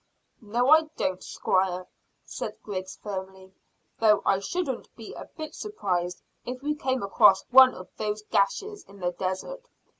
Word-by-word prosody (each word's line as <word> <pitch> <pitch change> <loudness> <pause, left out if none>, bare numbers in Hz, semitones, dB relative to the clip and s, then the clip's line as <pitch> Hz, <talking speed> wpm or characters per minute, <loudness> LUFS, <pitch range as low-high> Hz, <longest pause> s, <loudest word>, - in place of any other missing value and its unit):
"No, 240 +5 +1
I 315 0 +6
don't, 185 -1 -1
squire," 185 -1 0 0.4
said - - -6
Griggs 190 -2 -5
firmly, 190 -1 -7 0.5
"though 215 -2 +4
I 195 - +3
shouldn't 270 - -3
be 225 -2 -9
a - - -8
bit 310 -1 -6
surprised 180 - -3 0.2
if 250 +2 -6
we 300 +1 0
came 260 -5 -1
across 195 -1 +5
one 260 0 +8
of 185 - -9
those 210 0 -3
gashes 405 - 0
in 200 - -16
the 175 -1 -1
desert. 190 - -4
210 Hz, 150 wpm, -27 LUFS, 190-265 Hz, 0.5 s, one